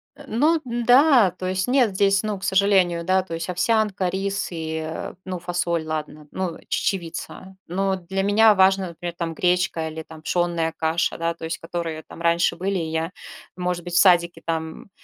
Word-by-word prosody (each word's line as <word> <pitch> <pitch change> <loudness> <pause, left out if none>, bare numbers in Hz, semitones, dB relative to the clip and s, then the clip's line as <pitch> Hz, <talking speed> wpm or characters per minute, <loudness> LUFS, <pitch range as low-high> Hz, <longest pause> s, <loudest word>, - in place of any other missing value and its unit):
Э, - - -13
ну 310 +8 +2
да. 245 - +5
То 185 0 -6
есть 185 +2 -1
нет 250 -5 +3
здесь, 195 +1 +3
ну, 210 -2 -2
к - - -13
сожалению, 190 -3 +3
да, 185 +1 +2
то 170 - -8
есть 165 +2 -4
овсянка, 190 0 +1
рис 195 +2 -2
и, 160 -1 -4
э, 160 - -5
ну, 185 -1 -4
фасоль, 170 -2 -2
ладно, 155 -1 -5
ну, 185 -3 -3
чечевица, 190 +1 -3
но 190 +2 0
для 190 +2 -3
меня 215 +2 +5
важно, 190 0 +3
например, 170 +1 -6
там 165 -1 -3
гречка 180 -1 0
или 160 0 -7
там 160 0 -13
пшенная 170 -1 0
каша, 160 +1 0
да, 165 0 -1
то 165 -1 -8
есть 165 - -3
которые 165 -2 -5
там 170 - -12
раньше 170 +1 +2
были, 190 +3 -2
я, 160 +1 -2 0.4
может 180 -1 -2
быть, 175 -1 -7
в - - +2
садике 175 -2 +4
там 160 +2 -4
180 Hz, 185 wpm, -23 LUFS, 165-195 Hz, 0.4 s, да